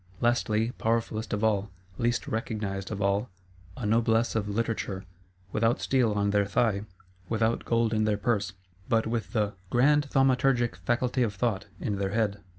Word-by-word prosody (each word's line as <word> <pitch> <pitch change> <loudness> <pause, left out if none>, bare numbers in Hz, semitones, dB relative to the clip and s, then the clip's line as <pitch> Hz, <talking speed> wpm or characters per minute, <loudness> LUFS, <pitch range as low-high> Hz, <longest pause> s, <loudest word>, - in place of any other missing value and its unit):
Lastly, 115 -1 +1
powerfulest 110 -2 -1
of 105 +1 -1
all, 105 -2 +2 0.3
least 120 0 0
recognised 105 -4 -3
of 100 -2 -3
all, 100 +4 +1 0.5
a 120 - -4
Noblesse 115 +1 +2
of 105 -2 -1
Literature; 105 -3 -2 0.5
without 115 +2 +2
steel 125 -5 +2
on 100 0 +1
their 100 -1 +2
thigh, 100 0 +1 0.4
without 115 0 +1
gold 115 -1 +2
in 110 0 +2
their 105 -1 +1
purse, 100 -3 0 0.4
but 115 -1 +3
with 110 -4 -3
the 105 -2 +1 0.2
"grand 145 +5 +3
thaumaturgic 130 -2 +3
faculty 125 +1 0
of 110 -4 0
Thought" 105 -1 -1
in 105 -2 -2
their 100 0 -2
head. 105 -3 0
110 Hz, 155 wpm, -28 LUFS, 105-120 Hz, 0.5 s, but